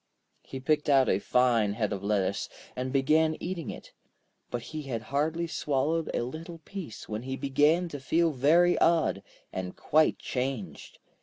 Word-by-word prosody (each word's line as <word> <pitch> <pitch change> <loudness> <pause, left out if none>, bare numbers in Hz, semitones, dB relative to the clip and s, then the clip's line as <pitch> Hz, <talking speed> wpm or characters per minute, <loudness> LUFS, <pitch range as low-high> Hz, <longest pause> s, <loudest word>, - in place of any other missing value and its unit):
He 135 - -8
picked 150 +2 +1
out 135 -3 +5
a 95 - +2
fine 115 -4 +2
head 105 -1 -1
of 100 -1 -5
lettuce, 100 -1 0 0.3
and 130 +1 -3
began 155 +4 +3
eating 175 -3 -4
it. - - -9 0.6
But 120 -1 -4
he 155 - -3
had 120 -6 -4
hardly 160 +4 +1
swallowed 155 +1 -1
a - - 0
little 160 +7 -7
piece, 165 - -8
when 105 +1 -4
he 130 +2 -4
began 145 +6 +2
to 145 - -6
feel 165 +5 +2
very 160 +6 +4
odd, 165 -11 +3 0.3
and 90 -1 -4
quite 155 +1 +3
changed. 125 - -4
135 Hz, 160 wpm, -28 LUFS, 120-160 Hz, 0.6 s, out